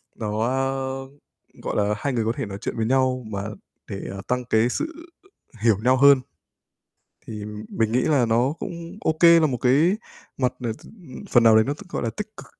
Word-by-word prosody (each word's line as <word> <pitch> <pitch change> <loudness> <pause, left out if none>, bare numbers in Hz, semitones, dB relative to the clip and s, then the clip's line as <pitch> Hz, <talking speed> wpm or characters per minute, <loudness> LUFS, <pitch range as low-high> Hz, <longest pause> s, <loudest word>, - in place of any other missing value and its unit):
nó, 105 0 -3
ơ, 135 +1 -2 0.6
gọi - - -3
là, 105 0 +2
hai 140 +3 -2
người 115 -2 0
có 115 - +1
thể - - -3
nói 100 -1 -6
chuyện - - -4
với 110 - 0
nhau 130 0 +1
mà 100 -2 -4 0.5
để 100 - -5 0.3
tăng 125 0 -1
cái 115 0 +2
sự 315 - -3 0.7
hiểu 110 -4 +4
nhau 130 +1 +5
hơn, 140 0 +6 1.1
thì 105 -2 -6 0.2
mình 115 -1 -1
nghĩ 125 - +3
là 140 -6 +2
nó 120 +5 +2
cũng 170 +3 -7
OK, 160 +2 +1 0.2
là 155 - +4
một 125 -4 -2
cái 150 +10 +3 0.4
mặt, 125 -1 +1
ờ, 115 -2 -2
t - - -11 0.5
phần 120 - +5
nào 115 -1 +6
đấy 110 - +5
t - - -9
nó, 145 - 0
gọi - - -4
là, 115 - -1
tích 210 0 -6
cực, - - -11
125 Hz, 200 wpm, -23 LUFS, 110-135 Hz, 1.1 s, hơn